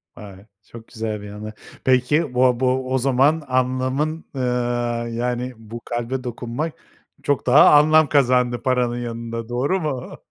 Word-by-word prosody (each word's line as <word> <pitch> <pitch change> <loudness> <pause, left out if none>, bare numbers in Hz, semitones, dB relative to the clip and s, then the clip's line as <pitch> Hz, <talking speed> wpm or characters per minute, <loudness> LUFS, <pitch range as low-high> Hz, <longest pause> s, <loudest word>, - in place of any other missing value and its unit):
Vay, 100 -1 -12 0.2
çok 115 0 -13
güzel 110 -3 -5
bir 105 - -9
anı. 105 +1 -8 0.3
Peki, 130 +3 +2
bo 125 -1 +3
bo 130 0 0
o - - +3
zaman 135 +4 +2
anlamın, 130 +5 -1
eee, 130 - -3 0.7
yani, 125 +1 -2
bu 115 +1 -9
kalbe 120 +2 -3
dokunmak 125 +5 -4 0.5
çok 145 -2 0
daha - - +7
anlam 155 0 +4
kazandı 125 -3 +2
paranın 125 -2 0
yanında, 115 -1 -5
doğru 140 +10 0
mu? 135 -5 -4
125 Hz, 140 wpm, -21 LUFS, 120-135 Hz, 0.7 s, daha